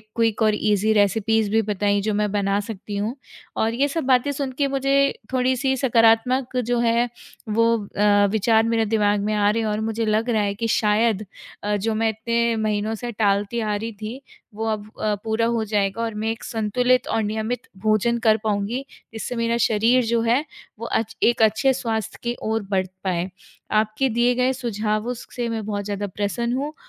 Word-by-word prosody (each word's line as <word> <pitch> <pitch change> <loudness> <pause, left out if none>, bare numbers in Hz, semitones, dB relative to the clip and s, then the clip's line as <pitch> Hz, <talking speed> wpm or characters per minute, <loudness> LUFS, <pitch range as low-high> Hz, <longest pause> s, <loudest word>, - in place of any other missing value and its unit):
Quick 225 -1 +1
और 215 -1 +4
easy 210 0 +2
recipes 215 +1 +2
भी 225 +1 +3
बताई 205 -1 0
जो 215 +1 -1
मैं 210 0 0
बना 200 -1 +1
सकती 205 -1 -6
हूँ। 215 +5 -2 0.4
और 225 +1 +1
ये 275 +4 +2
सब 320 +3 -2
बातें 260 +2 +3
सुन 275 -1 -3
के 285 - +2
मुझे 275 0 +2 0.2
थोड़ी-सी 260 +1 +1
सकारात्मक 245 +1 +3
जो 245 0 0
है 235 +1 +2 0.4
वो 230 +2 +3 0.3
अ, 205 0 +4
विचार 220 +1 +3
मेरे 225 -1 +1
दिमाग 210 -1 +2
में 215 - 0
आ 205 -1 +3
रहे 225 +2 +1
हैं 220 - -1
और 210 0 -1
मुझे 225 +1 -1
लग 215 +2 +1
रहा 220 -3 +2
है 200 -1 0
कि 230 +2 -2
शायद 215 0 +2 0.4
अ, 210 0 0
जो 215 +2 -1
मैं 225 +1 +1
इतने 235 +1 0
महीनों 215 0 -1
से 240 +2 -5
टालती 205 +1 0
आ 215 -2 -1
रही 225 +3 -4
थी, 220 +6 -7 0.3
वो 220 +1 -3
अब 215 -1 -2 0.2
अ, 215 - +1
पूरा 225 +1 0
हो 230 -1 0
जाएगा। 205 0 0
और 230 -1 -2
मैं 215 +1 -2
एक 225 - -7
संतुलित 245 +3 +1
और 225 - 0
नियमित 220 +3 -3 0.2
भोजन 215 +2 +2
कर 220 -2 +4
पाऊँगी 215 +4 -1 0.3
जिससे 225 +2 -4
मेरा 230 0 0
शरीर 235 +2 +3
जो 230 0 +1
है, 235 +5 +2 0.4
वो 230 - -5
अच 225 -2 -2
एक 235 -1 +3
अच्छे 220 +5 +4
स्वास्थ्य 225 -4 -3
की 240 0 -1
ओर 220 0 0
बढ़ 190 -1 +2 0.2
पाए। 180 -1 -1 0.5
आपके 220 +5 -1
दिए 240 +1 +2
गए 255 +1 +2
सुझावों 220 -1 -2
स 235 - -10
से 240 -1 -2
मैं 225 -2 -3
बहुत 205 -1 -3
ज़्यादा 205 0 -3
प्रसन्न 205 +5 -2
हूँ 290 +3 -3
220 Hz, 195 wpm, -23 LUFS, 210-235 Hz, 0.5 s, और